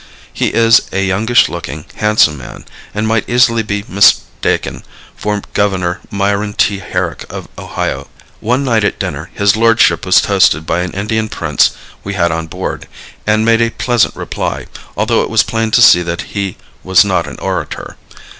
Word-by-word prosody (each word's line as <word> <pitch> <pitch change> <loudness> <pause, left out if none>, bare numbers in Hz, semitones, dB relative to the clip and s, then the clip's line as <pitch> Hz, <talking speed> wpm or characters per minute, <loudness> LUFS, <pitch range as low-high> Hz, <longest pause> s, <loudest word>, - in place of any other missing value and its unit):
He - - 0
is 115 0 +3
a 95 +1 0
youngish 110 +6 +3
looking, 75 0 -7
handsome 105 -8 +3
man, 65 -4 -11 0.3
and 105 +1 -2
might 110 -1 0
easily 120 -1 +3
be 100 -1 -3
mistaken 100 +2 +1 0.3
for 105 -1 -3
Governor 95 -4 0
Myron 100 +1 -1
T. 100 -1 +1
Herrick 90 - -3
of - - -7
Ohio. - - -4 0.3
One 125 +5 0
night 115 -5 +1
at 105 - 0
dinner - - -5
his 100 0 +3
lordship 115 +1 +3
was - - +5
toasted 80 +2 +2
by 80 +2 -1
an 90 0 -2
Indian 110 +2 -2
prince 75 -6 +1 0.3
we 100 0 -5
had 85 -2 +1
on 80 0 -3
board, - - -5 0.4
and 110 +1 +2
made 115 0 +3
a 115 - +2
pleasant 120 -1 0
reply, - - -4 0.3
although - - +2
it - - -3
was - - +3
plain 115 0 -2
to 120 +2 +4
see 90 - +7
that 85 +1 -3
he 100 -2 -3 0.3
was 95 +1 +4
not 90 -4 0
an - - -8
orator. - - -4
100 Hz, 170 wpm, -14 LUFS, 95-115 Hz, 0.4 s, see